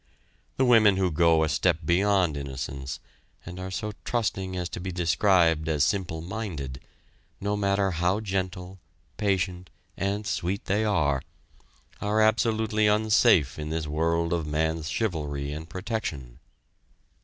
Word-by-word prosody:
The 130 Hz, -, +3 dB
women 110 Hz, -5 st, +5 dB
who 95 Hz, -2 st, +1 dB
go 80 Hz, 0 st, +4 dB
a -, -, +1 dB
step 75 Hz, -, +2 dB
beyond 90 Hz, -1 st, +2 dB
innocence 70 Hz, -1 st, -5 dB, 0.5 s
and 90 Hz, +1 st, -8 dB
are 95 Hz, 0 st, -5 dB
so 105 Hz, +3 st, -3 dB
trusting 95 Hz, -6 st, -2 dB
as 90 Hz, -1 st, -2 dB
to -, -, -6 dB
be 95 Hz, +1 st, -4 dB
described 85 Hz, -2 st, +2 dB
as 75 Hz, -2 st, +2 dB
simple 85 Hz, -2 st, -1 dB
minded, 85 Hz, -, -5 dB, 0.6 s
no 100 Hz, +1 st, -1 dB
matter 100 Hz, -1 st, +1 dB
how 90 Hz, +4 st, +1 dB
gentle, 95 Hz, -2 st, -4 dB, 0.4 s
patient, 90 Hz, -3 st, -1 dB, 0.3 s
and 100 Hz, +2 st, -2 dB
sweet 95 Hz, 0 st, -2 dB
they 105 Hz, +3 st, +1 dB
are, 75 Hz, -10 st, +1 dB, 0.8 s
are 105 Hz, +1 st, +1 dB
absolutely 110 Hz, -1 st, +2 dB
unsafe 105 Hz, -, +3 dB
in 75 Hz, 0 st, -4 dB
this 80 Hz, 0 st, -2 dB
world 85 Hz, +3 st, 0 dB
of 85 Hz, -3 st, -1 dB
man's 80 Hz, +1 st, -1 dB
chivalry 75 Hz, -9 st, -2 dB
and 80 Hz, +2 st, -7 dB
protection. 85 Hz, -, -5 dB
90 Hz, 135 wpm, -26 LUFS, 80-100 Hz, 0.8 s, women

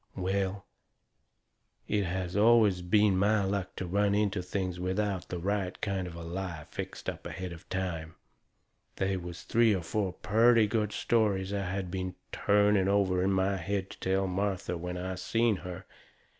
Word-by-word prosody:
Well, 95 Hz, +1 st, -1 dB, 1.2 s
it 100 Hz, -2 st, +1 dB
has 90 Hz, 0 st, -3 dB
always 105 Hz, -3 st, +5 dB
been 100 Hz, +1 st, +3 dB
my 105 Hz, +1 st, +3 dB
luck 95 Hz, -1 st, -2 dB
to 95 Hz, -, -4 dB
run 100 Hz, +3 st, +2 dB
into 105 Hz, -2 st, +1 dB
things 90 Hz, -1 st, -3 dB
without 95 Hz, 0 st, -1 dB
the 90 Hz, -, -3 dB
right 95 Hz, +1 st, -2 dB
kind 95 Hz, -3 st, -2 dB
of 85 Hz, -, -8 dB
a 85 Hz, -, -7 dB
lie 85 Hz, -2 st, -5 dB
fixed -, -, -6 dB
up -, -, -4 dB
ahead 90 Hz, +2 st, -5 dB
of 85 Hz, +1 st, -13 dB
time. 85 Hz, -4 st, -3 dB, 0.8 s
They 95 Hz, 0 st, 0 dB
was 90 Hz, -2 st, -6 dB
three 115 Hz, -2 st, +3 dB
or 90 Hz, -, -3 dB
four 95 Hz, +1 st, -1 dB
purty 115 Hz, +2 st, +4 dB
good 105 Hz, -1 st, 0 dB
stories 100 Hz, -5 st, +1 dB
I 100 Hz, -1 st, -1 dB
had 95 Hz, -1 st, -3 dB
been 95 Hz, -1 st, -3 dB, 0.2 s
trying 100 Hz, -1 st, +3 dB
over 95 Hz, -2 st, +2 dB
in 95 Hz, +1 st, +2 dB
my 95 Hz, +1 st, +1 dB
head 95 Hz, +2 st, -2 dB
to -, -, -12 dB
tell 95 Hz, +1 st, +1 dB
Martha 95 Hz, -1 st, -1 dB
when 90 Hz, +1 st, -4 dB
I 95 Hz, +1 st, -3 dB
seen 110 Hz, +4 st, +1 dB
her. 90 Hz, +1 st, -8 dB
95 Hz, 170 wpm, -30 LUFS, 90-100 Hz, 1.2 s, always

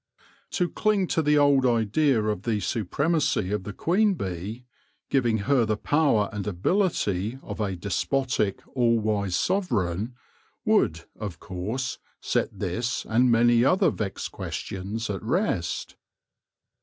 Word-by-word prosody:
To 180 Hz, -, +1 dB
cling 210 Hz, 0 st, +1 dB
to 160 Hz, -, +2 dB
the 150 Hz, -1 st, +3 dB
old 145 Hz, -2 st, +5 dB
idea 120 Hz, +1 st, +2 dB
of 105 Hz, -3 st, -1 dB
the 110 Hz, -1 st, 0 dB
supremacy 120 Hz, -, 0 dB
of 105 Hz, -3 st, -2 dB
the 105 Hz, -, -4 dB
queen 195 Hz, -, +2 dB
bee, 100 Hz, -, -5 dB, 0.5 s
giving 120 Hz, -5 st, +2 dB
her 135 Hz, -2 st, +3 dB
the 110 Hz, -1 st, 0 dB
power 140 Hz, -7 st, +2 dB
and 105 Hz, -1 st, -4 dB
ability 105 Hz, -, 0 dB
of 105 Hz, -, -7 dB
a 100 Hz, -3 st, -1 dB
despotic, 105 Hz, +3 st, -1 dB
all 120 Hz, -2 st, +3 dB
wise 105 Hz, -4 st, 0 dB
sovereign, 120 Hz, -, 0 dB, 0.5 s
would, -, -, +2 dB, 0.2 s
of 100 Hz, -7 st, -5 dB
course, 110 Hz, +9 st, -4 dB, 0.2 s
set -, -, 0 dB
this 115 Hz, +1 st, -2 dB
and 125 Hz, +3 st, +3 dB
many 120 Hz, 0 st, +5 dB
other 185 Hz, +4 st, +4 dB
vexed 100 Hz, -3 st, -4 dB
questions 100 Hz, +4 st, -5 dB
at 100 Hz, -2 st, -3 dB
rest. 115 Hz, -, -1 dB
115 Hz, 130 wpm, -26 LUFS, 100-140 Hz, 0.5 s, old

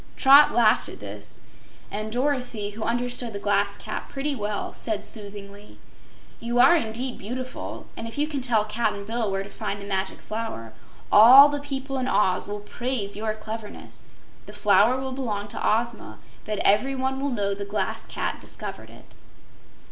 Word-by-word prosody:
Trot 280 Hz, +2 st, +7 dB
laughed 225 Hz, -3 st, +3 dB
at -, -, -10 dB
this, 105 Hz, +1 st, -9 dB, 0.5 s
and 215 Hz, +1 st, -4 dB
Dorothy, 250 Hz, -5 st, -1 dB
who 215 Hz, +2 st, -9 dB
understood 245 Hz, 0 st, -2 dB
the -, -, -4 dB
Glass 200 Hz, 0 st, +1 dB
Cat -, -, -6 dB
pretty 280 Hz, +1 st, -2 dB
well, 210 Hz, -3 st, -3 dB
said 215 Hz, -3 st, -3 dB
soothingly: 205 Hz, -1 st, -7 dB, 0.6 s
"You 240 Hz, +1 st, -1 dB
are 265 Hz, +8 st, +7 dB
indeed 250 Hz, -3 st, -2 dB
beautiful, 255 Hz, +5 st, -6 dB
and 225 Hz, -, -6 dB
if 225 Hz, -, -8 dB
you 295 Hz, +1 st, +1 dB
can 290 Hz, -3 st, -3 dB
tell 230 Hz, -4 st, +3 dB
Cap'n 210 Hz, -2 st, -2 dB
Bill 225 Hz, 0 st, -2 dB
where 195 Hz, 0 st, -1 dB
to 200 Hz, -, -12 dB
find 205 Hz, -2 st, -4 dB
the 200 Hz, -, -8 dB
Magic 190 Hz, -1 st, -2 dB
Flower, 215 Hz, -, -6 dB, 0.4 s
all 255 Hz, +7 st, +10 dB
the 290 Hz, 0 st, -2 dB
people 270 Hz, -1 st, -4 dB
in 255 Hz, -, -2 dB
Oz 190 Hz, -7 st, +2 dB
will 205 Hz, 0 st, -5 dB
praise 225 Hz, -2 st, -3 dB
your 215 Hz, +1 st, -2 dB
cleverness. 215 Hz, 0 st, -8 dB, 0.5 s
The -, -, -10 dB
Flower 215 Hz, +4 st, +4 dB
will 265 Hz, 0 st, -4 dB
belong 220 Hz, -6 st, -3 dB
to -, -, -6 dB
Ozma, 225 Hz, -, -1 dB, 0.3 s
but 215 Hz, -1 st, -3 dB
everyone 265 Hz, +5 st, +2 dB
will 280 Hz, +1 st, -1 dB
know 205 Hz, -5 st, -1 dB
the 200 Hz, +1 st, -5 dB
Glass 200 Hz, +1 st, -3 dB
Cat -, -, -3 dB
discovered -, -, -7 dB
it." -, -, -15 dB
220 Hz, 170 wpm, -25 LUFS, 205-255 Hz, 0.6 s, all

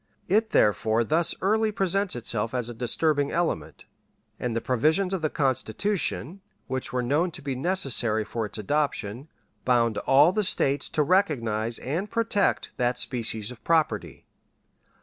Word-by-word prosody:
It 220 Hz, +4 st, +2 dB
therefore 110 Hz, -, +2 dB
thus 160 Hz, +7 st, +1 dB
early 215 Hz, +2 st, +2 dB
presents 195 Hz, -2 st, 0 dB
itself 115 Hz, -1 st, -2 dB
as 120 Hz, -2 st, -1 dB
a -, -, -6 dB
disturbing 140 Hz, +5 st, +1 dB
element, 165 Hz, -, -2 dB, 0.5 s
and 120 Hz, -2 st, -2 dB
the -, -, +1 dB
provisions 155 Hz, +11 st, +1 dB
of 190 Hz, -, -1 dB
the 155 Hz, -, 0 dB
Constitution, 160 Hz, -, -1 dB, 0.2 s
which 130 Hz, 0 st, -4 dB
were 125 Hz, 0 st, -1 dB
known 150 Hz, +8 st, +1 dB
to 165 Hz, -, -9 dB
be 140 Hz, -1 st, -2 dB
necessary 130 Hz, -, +1 dB
for 115 Hz, -1 st, -3 dB
its 100 Hz, -, -7 dB
adoption, 130 Hz, 0 st, -2 dB, 0.4 s
bound 120 Hz, -3 st, +2 dB
all 145 Hz, +5 st, +5 dB
the 210 Hz, +2 st, 0 dB
States 140 Hz, -6 st, +2 dB
to 150 Hz, -, +1 dB
recognize 120 Hz, -, +1 dB
and 170 Hz, +10 st, -3 dB
protect 230 Hz, -3 st, 0 dB
that 125 Hz, 0 st, 0 dB
species 115 Hz, -3 st, -3 dB
of 125 Hz, -, -13 dB
property. 165 Hz, -2 st, 0 dB
140 Hz, 150 wpm, -26 LUFS, 115-175 Hz, 0.5 s, all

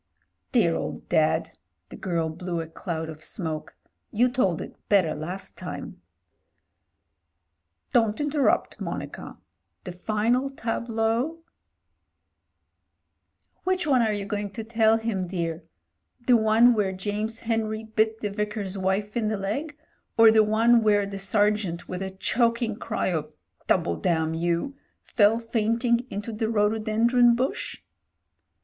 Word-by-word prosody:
"Dear 175 Hz, -10 st, +3 dB
old -, -, -5 dB
Dad 155 Hz, -1 st, +2 dB, 0.2 s
!" 80 Hz, +1 st, -52 dB
The -, -, -9 dB
girl 170 Hz, -3 st, -1 dB
blew 170 Hz, +1 st, -4 dB
a 165 Hz, -, -3 dB
cloud 160 Hz, 0 st, -5 dB
of 160 Hz, 0 st, -9 dB
smoke. 160 Hz, -6 st, -4 dB, 0.4 s
"You 245 Hz, +4 st, +3 dB
told 195 Hz, -, +1 dB
it -, -, -7 dB
better 185 Hz, -7 st, +4 dB
last 180 Hz, +6 st, -6 dB
time." -, -, -7 dB, 1.9 s
"Don't 225 Hz, -3 st, +3 dB
interrupt, 295 Hz, -1 st, +1 dB
Monica. -, -, -6 dB, 0.5 s
The 180 Hz, -, -6 dB
final 220 Hz, +8 st, 0 dB
tableau 235 Hz, +5 st, -1 dB, 1.4 s
" -, -, -49 dB
"Which 370 Hz, -1 st, 0 dB
one 265 Hz, -5 st, +4 dB
are 220 Hz, -2 st, +2 dB
you 205 Hz, -1 st, -3 dB
going 205 Hz, -1 st, -3 dB
to 225 Hz, -, -5 dB
tell 225 Hz, 0 st, +3 dB
him, 220 Hz, -5 st, -2 dB
dear? 170 Hz, -2 st, -3 dB, 0.6 s
The 250 Hz, -, +6 dB
one 225 Hz, +2 st, +5 dB
where 205 Hz, -4 st, 0 dB
James 210 Hz, +4 st, -3 dB
Henry 220 Hz, -1 st, -1 dB
bit 220 Hz, 0 st, 0 dB
the 210 Hz, -, -2 dB
Vicar's 210 Hz, -2 st, -3 dB
wife 195 Hz, +3 st, -1 dB
in 230 Hz, -3 st, 0 dB
the 215 Hz, 0 st, -1 dB
leg, 280 Hz, +11 st, -3 dB, 0.4 s
or 225 Hz, -1 st, +8 dB
the 220 Hz, 0 st, +6 dB
one 225 Hz, +2 st, +4 dB
where 205 Hz, -2 st, +3 dB
the 195 Hz, 0 st, -6 dB
sergeant 205 Hz, -3 st, 0 dB
with 180 Hz, 0 st, -5 dB
a 190 Hz, -, -3 dB
choking 230 Hz, +3 st, 0 dB
cry 210 Hz, -, -2 dB
of 155 Hz, -4 st, -3 dB, 0.3 s
'Double, 85 Hz, -1 st, +2 dB
damn 160 Hz, -2 st, 0 dB
you 170 Hz, +10 st, -1 dB
I' -, -, -31 dB
fell 210 Hz, 0 st, +5 dB
fainting 235 Hz, +1 st, 0 dB
into 205 Hz, +3 st, -5 dB
the 220 Hz, 0 st, -1 dB
rhodo 215 Hz, 0 st, +2 dB
dendron 235 Hz, +3 st, +4 dB
bush 255 Hz, +3 st, -3 dB
215 Hz, 140 wpm, -26 LUFS, 190-230 Hz, 1.9 s, or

